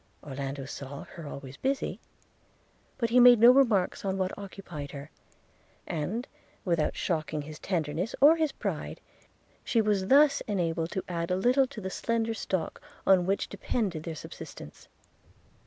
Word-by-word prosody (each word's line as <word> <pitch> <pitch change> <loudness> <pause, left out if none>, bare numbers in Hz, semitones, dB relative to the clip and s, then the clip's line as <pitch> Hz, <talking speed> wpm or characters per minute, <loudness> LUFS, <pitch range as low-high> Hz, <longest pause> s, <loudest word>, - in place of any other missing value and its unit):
– - - -37
Orlando 135 0 -4
saw 140 0 -7
her 165 -3 -9
always 140 -1 -8
busy; 270 +1 -1 1.0
but 230 -2 -1
he 250 - +6
made 245 -2 +8
no 235 +2 +9
remarks 230 -9 +3
on 195 -1 -1
what 185 -1 -1
occupied 185 -7 -8
her; 140 +1 -8 0.7
and, 190 - -3 0.4
without 170 -4 +1
shocking 155 -3 -2
his 150 +1 -9
tenderness 170 +3 -2
or 295 +4 +8
his 315 -3 0
pride, - - -4 0.6
she 230 - +1
was 205 -3 +1
thus 280 +3 +5
enabled 165 -5 -1
to 190 - -2
add 170 -1 -3
a 180 - +2
little 250 +7 +3
to 255 -4 -9
the 190 -2 -5
slender 230 +1 -1
stock 190 -5 -3 0.2
on 185 -2 +5
which 195 +1 0
depended 190 -10 -2
their 160 0 -5
subsistence. 75 - -10
190 Hz, 155 wpm, -29 LUFS, 155-230 Hz, 1.0 s, no